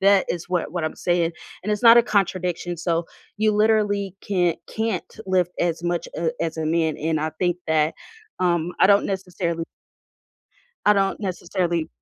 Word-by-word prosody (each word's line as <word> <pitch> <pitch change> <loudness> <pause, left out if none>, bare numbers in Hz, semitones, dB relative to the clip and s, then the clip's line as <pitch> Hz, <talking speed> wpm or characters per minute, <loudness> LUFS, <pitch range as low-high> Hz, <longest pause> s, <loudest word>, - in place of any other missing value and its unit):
that 195 0 +4
is 175 0 -4
what 180 -4 -1
what 175 -3 -2
I'm 155 - -3
saying, 175 -1 +1 0.3
and 210 - -3
it's 210 - -2
not 230 0 +9
a 235 - +8
contradiction, 180 -4 -1
so 170 0 -1 0.3
you 215 0 +2
literally 205 -2 +2
can't 175 -4 0
can't 220 -5 -3
lift 180 -2 +1
as 170 -1 0
much 175 0 -1
a 165 -1 0
as 165 -1 -2
a 160 -1 -2
man, 160 -1 +1
and 155 0 -1
I 155 - -1
think 175 -1 +1
that, 155 0 +2 0.5
um, 175 -1 +1
I - - +8
don't 200 0 +5
necessarily 180 -3 -3 1.2
I 210 - +8
don't 195 -1 +1
necessarily 175 -4 -2
175 Hz, 170 wpm, -23 LUFS, 165-200 Hz, 1.2 s, not